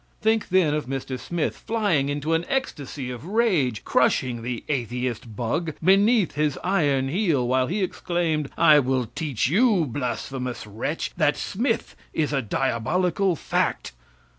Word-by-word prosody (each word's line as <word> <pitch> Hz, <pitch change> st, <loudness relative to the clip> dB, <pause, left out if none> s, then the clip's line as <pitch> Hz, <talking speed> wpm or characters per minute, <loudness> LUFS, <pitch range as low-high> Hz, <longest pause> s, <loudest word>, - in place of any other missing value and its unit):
Think 220 Hz, 0 st, +1 dB
then 180 Hz, -5 st, +3 dB
of 150 Hz, -4 st, -2 dB
Mr. 130 Hz, -1 st, -4 dB
Smith 170 Hz, +6 st, -2 dB
flying 200 Hz, -11 st, 0 dB
into 145 Hz, +3 st, -1 dB
an 165 Hz, +1 st, +1 dB
ecstasy 145 Hz, -, -3 dB
of 125 Hz, +1 st, -7 dB
rage, 175 Hz, -, +1 dB
crushing 120 Hz, -2 st, +1 dB
the 120 Hz, 0 st, -4 dB
atheist 125 Hz, -4 st, -3 dB
bug 145 Hz, +8 st, -2 dB
beneath 195 Hz, +3 st, +4 dB
his 150 Hz, -1 st, 0 dB
iron 145 Hz, -8 st, +2 dB
heel, 155 Hz, -, +1 dB
while 130 Hz, +1 st, +2 dB
he 195 Hz, +4 st, -1 dB
exclaimed, 165 Hz, -5 st, -1 dB
"I 155 Hz, -3 st, +7 dB
will 130 Hz, -2 st, 0 dB
teach 145 Hz, -9 st, -1 dB
you, 200 Hz, -, +3 dB
blasphemous 125 Hz, -1 st, -4 dB
wretch, 110 Hz, +10 st, -3 dB
that 150 Hz, -1 st, +2 dB
Smith 230 Hz, +3 st, -2 dB, 0.2 s
is 150 Hz, -2 st, 0 dB
a 135 Hz, -, +1 dB
diabolical 165 Hz, -, 0 dB
fact!" -, -, -1 dB
150 Hz, 140 wpm, -24 LUFS, 130-180 Hz, 0.2 s, I